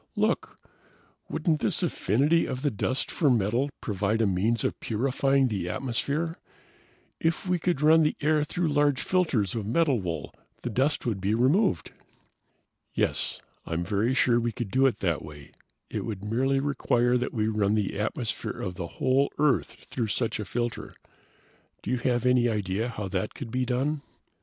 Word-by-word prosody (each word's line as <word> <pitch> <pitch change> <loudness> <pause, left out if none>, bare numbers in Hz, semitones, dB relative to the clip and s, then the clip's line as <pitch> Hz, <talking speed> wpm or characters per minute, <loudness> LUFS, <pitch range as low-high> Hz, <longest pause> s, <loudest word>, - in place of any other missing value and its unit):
"Look - - 0 0.7
wouldn't 155 -1 0
this - - 0
affinity 145 - +2
of 130 +2 -4
the 145 - +2
dust 130 +5 -1
for 150 - +2
metal 120 +4 +2
provide 105 +1 0
a 115 - +3
means 105 +4 +1
of - - -1
purifying 135 +3 +1
the 100 -6 -2
atmosphere? 140 - -2 0.8
If 165 +3 0
we 180 -1 +1
could 165 -3 0
run 160 +1 +7
the 150 - +2
air 150 0 +2
through 170 +2 -1
large 145 -2 +2
filters 145 - +1
of 110 -3 -3
metal 135 -1 +2
wool, 85 -3 -4 0.3
the 120 - -2
dust 135 +7 +1
would 110 -6 -1
be 100 +3 +1
removed!" 130 - +2 1.0
"Yes, - - 0 0.3
I'm 85 +1 -1
very 105 +7 0
sure 120 -3 +4
we 120 0 -1
could 110 -2 -5
do 135 +3 +4
it 115 -6 -2
that 85 -5 0
way. 75 -2 -11 0.4
It - - -4
would 105 -4 -5
merely 130 +5 +1
require 125 -3 +1
that 125 - -2
we 110 -2 0
run 105 -1 +1
the 105 -1 -1
atmosphere 110 +2 -3
of 90 - -3
the 90 -2 -5
whole 135 +2 +2
Earth 150 -2 +1
through 120 -4 -1
such 110 +2 -1
a 105 - -3
filter. 120 +3 -3 0.9
Do - - -3
you 125 - +2
have 120 0 0
any 125 -1 +4
idea 105 +1 -1
how 105 -4 -4
that 95 +2 -2
could 115 - -7
be 125 +1 0
done?" 135 +4 0
120 Hz, 170 wpm, -27 LUFS, 105-140 Hz, 1.0 s, run